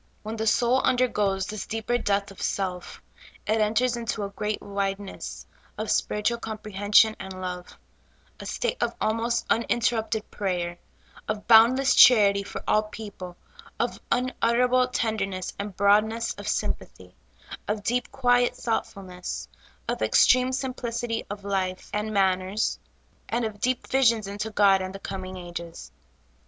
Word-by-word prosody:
When 215 +1 -5
the 220 0 -2
soul 240 +3 +3
undergoes 210 -7 +1
this 210 0 -6
deeper 225 +2 -1
death 200 -2 0
of 195 - -12
self, 185 -2 -3 0.4
it 220 +1 +1
enters 230 +4 +2
into 230 -3 -3
a 200 - -4
great 210 +1 -3
wideness 200 0 -4 0.3
of - - -2
spiritual 220 +3 0
comprehension 215 0 +2
and 190 -1 -7
love; 180 -1 -6 0.6
a - - -7
state - - -2
of - - 0
almost 230 +2 0
uninterrupted 225 -2 0
prayer; 175 -3 -2 0.5
of 215 -1 -3
boundless 240 +4 +6
charity 205 -5 +7
for 200 - -7
all 215 - +4
people; 205 -4 -9 0.4
of - - -1
unutterable 250 0 +2
ten 225 -3 -1
derness 190 -2 -3
and 200 -2 -5
broadness 220 +4 +3
of - - -9
sympathy; - - -3 0.5
of 210 0 -2
deep, 245 +3 -1
quiet 245 -2 +2
thoughtfulness; 190 -5 -4 0.4
of - - -2
extreme 255 0 +4
simplicity 240 -3 -3
of 205 0 -6
life 190 -2 -2
and 210 +1 -2
manners; 190 +1 +1 0.5
and 235 0 0
of 215 -2 -5
deep 255 +2 0
visions 235 -5 +3
into 205 +2 -4
God 200 -2 +4
and 185 +1 -5
the - - -7
com 195 -1 -6
ing 185 0 -7
ages. 175 -1 -8
215 Hz, 140 wpm, -26 LUFS, 195-235 Hz, 0.6 s, charity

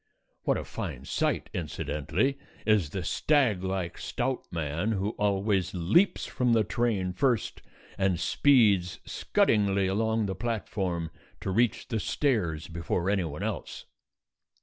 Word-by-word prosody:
(What - - +2
a - - -3
fine - - -6
sight, - - -1
incidentally, 80 - -1 0.3
is 105 -8 +3
the 90 +3 -4
stag 120 - +2
like 95 -2 -3
stout 130 -1 -3
man 85 +6 -1
who 100 +1 -1
always 100 -3 0
leaps 100 - +3
from 125 -2 +1
the 110 -1 +4
train 105 -6 0
first 120 +1 0 0.4
and 95 -3 +2
speeds 105 -9 +4
scuddingly 100 -2 +2
along 110 +3 +1
the 95 - -2
platform, 95 -7 -2 0.3
to 95 - -2
reach 115 +2 +1
the 115 - 0
stairs 95 - 0
before 85 +2 -1
any 95 -4 +1
one 75 -2 -5
else.) - - -4
100 Hz, 130 wpm, -28 LUFS, 90-115 Hz, 0.4 s, the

